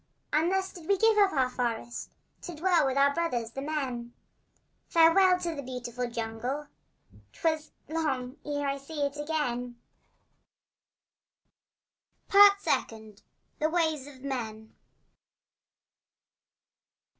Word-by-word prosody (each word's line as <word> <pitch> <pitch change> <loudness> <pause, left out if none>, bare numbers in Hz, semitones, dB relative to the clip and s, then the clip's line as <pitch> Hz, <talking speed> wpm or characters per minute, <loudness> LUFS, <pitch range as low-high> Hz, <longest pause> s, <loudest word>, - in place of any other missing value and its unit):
And 320 +4 +3
thus 385 0 -1
did 335 -3 -12
we 400 - +3
give 450 +2 +4
up 400 -1 +6
the 265 -7 +1
forest 240 -1 -3 0.3
To 350 - -7
dwell 340 -2 +3
with 265 0 -1
our 280 0 +4
brothers, 250 -9 -1
the 270 - -6
men— 260 -5 -4 0.7
Farewell 360 +3 +5
to 340 -2 -2
the 285 - -5
beautiful 250 -2 -5
jungle! 235 +6 -4 0.6
'Twas 315 -2 -1 0.2
long 275 -5 -2
ere 290 -1 -2
I 275 0 -2
saw 290 +1 -3
it 280 0 -3
again! 250 -6 -2 2.5
Part 400 0 +7
Second. 220 - -2 0.4
THE 310 - +2
WAYS 315 -5 0
OF 270 -2 -13
MEN. 220 -5 -5
285 Hz, 115 wpm, -29 LUFS, 245-325 Hz, 2.5 s, Part